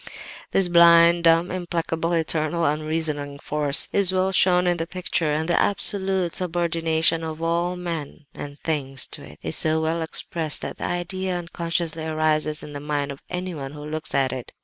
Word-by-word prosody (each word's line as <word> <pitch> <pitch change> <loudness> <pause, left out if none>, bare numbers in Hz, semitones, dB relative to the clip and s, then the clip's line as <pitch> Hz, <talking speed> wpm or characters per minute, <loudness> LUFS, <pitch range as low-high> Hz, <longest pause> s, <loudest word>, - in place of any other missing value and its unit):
"This 195 -2 +2
blind, 170 0 +6
dumb, 165 +1 +4
implacable, 170 -2 -2
eternal, 165 0 0
unreasoning 150 -1 -2
force 145 -1 +1
is 200 -2 +6
well 190 0 +1
shown 180 -1 +3
in 175 -1 +1
the 165 0 -3
picture, 175 -3 -2
and 155 +2 -1
the 175 - +2
absolute 190 -3 +1
subordination 165 -2 0
of 160 -1 -5
all 170 +2 -1
men 165 -4 -6
and 145 0 -8
things 135 -5 -1
to - - -3
it - - -13
is 80 - -2
so 155 0 +3
well 160 +1 -1
expressed 160 -1 -1
that - - -6
the - - -3
idea 180 +1 -3
unconsciously 170 -1 -3
arises 155 -1 0
in 150 - -9
the 145 - -5
mind 145 -1 -2
of 140 - -10
anyone 170 -7 -5
who 150 0 -9
looks 155 0 -5
at 135 -2 +2
it. 130 -2 -7
165 Hz, 170 wpm, -23 LUFS, 150-175 Hz, -, blind